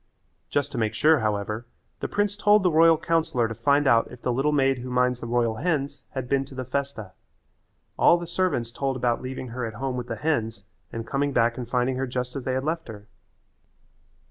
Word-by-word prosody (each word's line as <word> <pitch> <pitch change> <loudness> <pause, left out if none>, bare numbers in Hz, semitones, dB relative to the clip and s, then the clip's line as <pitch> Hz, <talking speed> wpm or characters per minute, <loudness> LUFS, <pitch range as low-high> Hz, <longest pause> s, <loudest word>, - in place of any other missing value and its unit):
Just 145 0 0
to 125 - -3
make 110 -2 0
sure, 155 0 +4
however, 105 +1 -2 0.3
the - - -2
prince 205 0 0
told 210 0 +4
the 180 - +3
royal 165 +1 +6
councillor 160 -7 +1
to 115 - -5
find 140 +6 +2
out 115 -3 +4
if 125 - -13
the 125 - 0
little 135 +4 +1
maid 135 -3 +2
who 125 +1 -6
minds 125 0 +1
the 115 - -6
royal 115 -2 +1
hens 145 -2 -1
had 130 -2 -3
been 135 +1 +1
to 135 - -13
the 130 0 -4
festa. 130 -6 -4 0.9
All 170 - +6
the 175 - -5
servants 170 -9 -1
told 135 +2 -2
about 120 -2 0
leaving 130 0 -6
her 125 +2 -5
at 110 -2 -4
home 130 +2 -3
with 120 -1 -4
the 115 - -3
hens 115 -5 -1 0.3
and 115 0 -5
coming 140 +3 -1
back 115 -1 +2
and 120 -2 -6
finding 125 +1 0
her 135 0 -1
just 125 +1 -4
as 135 -3 -5
they 130 - 0
had 130 +1 -1
left 165 +2 -2
her. 105 -2 -10
130 Hz, 220 wpm, -25 LUFS, 120-145 Hz, 0.9 s, royal